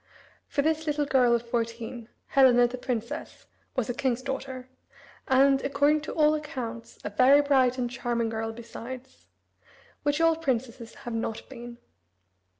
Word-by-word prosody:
For 285 - 0
this 315 +1 0
little 295 0 +1
girl 255 -4 +4
of 235 0 -3
fourteen, 230 0 -3 0.2
Helena, 250 -3 +6
the 250 +1 -7
princess, 235 -3 -4 0.3
was 255 -4 0
a 245 - -1
king's 255 -1 -1
daughter, 265 -1 -5 0.6
and, 270 +1 +4
according 285 +2 +2
to 310 - -6
all 305 -1 +4
accounts, 250 -7 -5
a 205 - -4
very 255 +7 +6
bright 265 -3 +3
and 250 -1 0
charming 240 -1 -2
girl 225 0 -3
besides 240 +3 -9 0.7
which 290 +1 0
all 330 0 +4
princesses 245 -6 -3
have 240 - -4
not 225 -1 -3
been. 240 -2 -9
255 Hz, 150 wpm, -27 LUFS, 235-280 Hz, 0.7 s, Helena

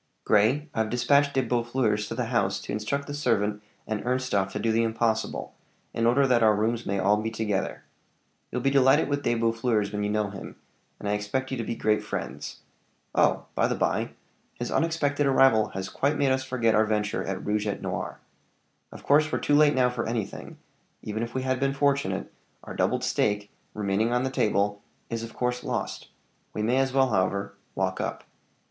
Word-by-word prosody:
"Grey, 120 +9 +3
I've 110 -1 0
dispatched 140 +4 +3
De 135 - +3
Boeffleurs 120 -3 0
to 115 - -5
the 125 0 -1
house 95 -4 +1
to - - -7
instruct 110 +7 -2
the 145 - -6
servant 105 -7 0 0.2
and 110 -1 -3
Ernstorff 125 -6 0
to - - -2
do 115 - +1
the 115 +1 +3
impossible, 115 -1 -1 0.4
in 115 0 +1
order 135 +4 +4
that 125 -3 +3
our 110 -1 +5
rooms 115 +2 -1
may 100 - 0
be - - 0
all 105 +2 +3
together. 110 -3 -2 0.7
You'll 125 - -3
be 135 - +3
delighted 135 +2 +4
with 145 0 0
De 120 - +1
Boeffleurs 115 -2 +1
when 105 0 -2
you 105 - 0
know 105 -1 0
him, 95 - -8 0.4
and - - -5
I - - +1
expect 105 +6 -2
you 130 - -2
to 115 - -2
be 115 - -3
great 105 -1 +1
friends. 75 +3 -6 0.5
Oh! - - +2
by - - +2
the - - -1
by, - - 0 0.4
his - - -4
unexpected 145 -3 +1
arrival 130 -5 +5
has 95 0 -3
quite 145 +2 0
made 140 -2 +2
us 130 0 +1
forget 125 -4 +1
our 110 +1 +4
venture 105 -1 0
at 95 0 -4
rouge 105 0 0
et 105 - -3
noir. - - -4 0.7
Of - - -11
course 150 +2 +4
we're - - +1
too 145 - 0
late 150 0 +5
now 125 -1 +3
for 120 -2 -3
anything; 110 -4 -4 0.5
even 110 +1 -3
if 115 +2 -4
we 130 - -1
had 130 -1 0
been 135 0 0
fortunate, 140 0 0 0.3
our - - -8
doubled - - 0
stake, 105 0 0 0.2
remaining 105 +2 0
on 125 +1 +1
the 130 - -1
table, 100 -4 +1 0.3
is 115 -1 -2
of 115 0 -8
course 125 0 -1
lost; - - -3 0.5
we 105 - -1
may 120 +4 +2
as 135 0 +2
well, 135 0 +3
however, 100 -1 0 0.2
walk 95 -1 -1
up." - - -4
115 Hz, 200 wpm, -27 LUFS, 105-130 Hz, 0.7 s, our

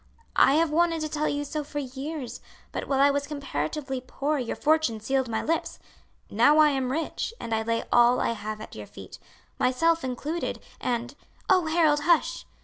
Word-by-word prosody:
I 270 - +5
have 320 0 +2
wanted 330 0 +2
to 310 - -2
tell 305 0 -1
you 290 0 -1
so 300 +1 -3
for 290 0 -8
years, 270 -1 -5 0.3
but - - -4
while 270 -1 +1
I 280 +1 +6
was 285 0 -2
comparatively 270 - -3
poor 285 +3 -2
your 245 -2 -3
fortune 310 -7 +2
sealed 265 +3 0
my 220 - -1
lips. 330 +2 -1 0.5
Now 240 +8 +5
I 305 -1 +7
am 265 -2 -1
rich, 325 - -3
and 230 - -4
I 220 - +1
lay 230 +1 -1
all 240 +1 +5
I - - +1
have 215 -1 -5
at - - -9
your - - -8
feet; - - -11 0.4
myself 330 +6 +2
included; 285 +6 -3 0.2
and 245 +1 -2 0.2
" - - -32
"Oh, 365 -3 +4
Harold, 315 -2 +3
hush!" 330 +2 +1
280 Hz, 190 wpm, -26 LUFS, 245-310 Hz, 0.5 s, I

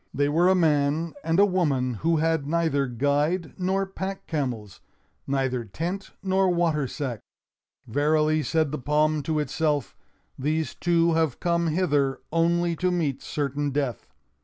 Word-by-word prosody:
They 145 +1 +2
were 170 +5 +3
a 190 - +5
man 155 -1 +1
and 165 +3 +1
a 200 - +7
woman 145 -10 +1
who 165 +1 +2
had 160 -2 0
neither 160 -4 +1
guide 145 +7 0
nor 190 +2 0
pack 190 0 -6
camels; 120 - -4 0.5
neither 130 -3 0
tent 175 - -4
nor 190 0 +2
water 165 -5 +1
sack. 130 -5 -4 0.7
"Verily," 155 +4 +2
said 155 -1 0
the 150 - -3
palm 150 +2 +1
to 155 +2 -2
itself, 150 -1 -1 0.4
"these 155 0 -1
two 170 -1 +2
have 160 -5 0
come 170 -1 +1
hither 145 -5 +1
only 170 +1 +2
to 185 - +1
meet 160 -7 -1
certain 145 0 -2
death." 135 -4 -3
155 Hz, 145 wpm, -25 LUFS, 140-170 Hz, 0.7 s, a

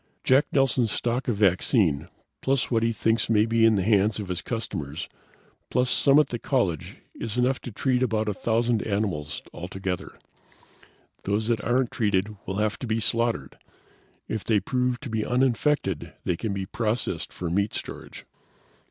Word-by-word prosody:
"Jack 130 +3 +4
Nelson's 130 -5 +2
stock 120 +4 -1
of 120 - +1
vaccine, 90 - +2 0.3
plus 135 -1 0
what 115 -2 +3
he 115 0 +2
thinks 115 +1 +1
may 110 -1 +4
be 115 0 +3
in 110 - +4
the 95 - +1
hands 105 +1 +3
of 100 -3 -5
his 90 -1 -2
customers, 75 - -4 0.6
plus 125 0 +1
some 140 0 +5
at 150 -2 +4
the 120 - -3
college 100 - -1 0.2
is 115 +1 -5
enough 125 +2 +1
to 125 - -7
treat 125 +3 0
about 110 -3 +1
a 105 - 0
thousand 115 +2 +1
animals 95 -8 -2
altogether. 90 0 -5 1.1
Those 105 +3 0
that 115 -2 +1
aren't 125 +1 +1
treated 105 -2 0
will 95 - -2
have 105 0 0
to 125 - -5
be 110 0 0
slaughtered. 115 - 0 0.7
If 110 -4 -3
they 110 0 +2
prove 125 +4 -1
to 140 - -6
be 110 -1 0
uninfected 125 - +1
they 90 - 0
can 110 +5 -3
be 100 -1 -3
processed 105 -4 -2
for 85 -2 -4
meat 100 +3 +1
storage. - - -7
110 Hz, 170 wpm, -26 LUFS, 100-120 Hz, 1.1 s, some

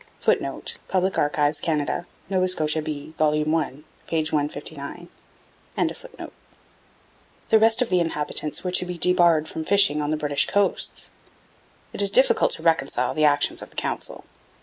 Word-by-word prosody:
[Footnote: - - -1
Public 190 0 0
Archives, 150 0 +1
Canada. 160 +1 -1 0.2
Nova 185 -1 +1
Scotia 155 -3 +1
B, 150 0 -6
vol. 155 -1 +3
i, 155 -1 0 0.4
p. 160 -1 0
159.] 150 +2 -4 2.4
The 220 - +5
rest 225 +3 +4
of 245 - -7
the 180 - +3
inhabitants 150 -2 -2
were 180 - -2
to 180 - +1
be 180 -1 -5
debarred 170 -3 +3
from 160 - -5
fishing 195 -5 +3
on 145 - -2
the 155 - 0
British 145 -2 +1
coasts. 205 -1 0 0.8
It - - -3
is 200 - +5
difficult 260 +7 +4
to 160 - -9
reconcile 135 -6 +1
the 155 -1 +2
actions 145 -1 +2
of - - -9
the - - -20
Council. - - -4
160 Hz, 150 wpm, -24 LUFS, 150-180 Hz, 2.4 s, The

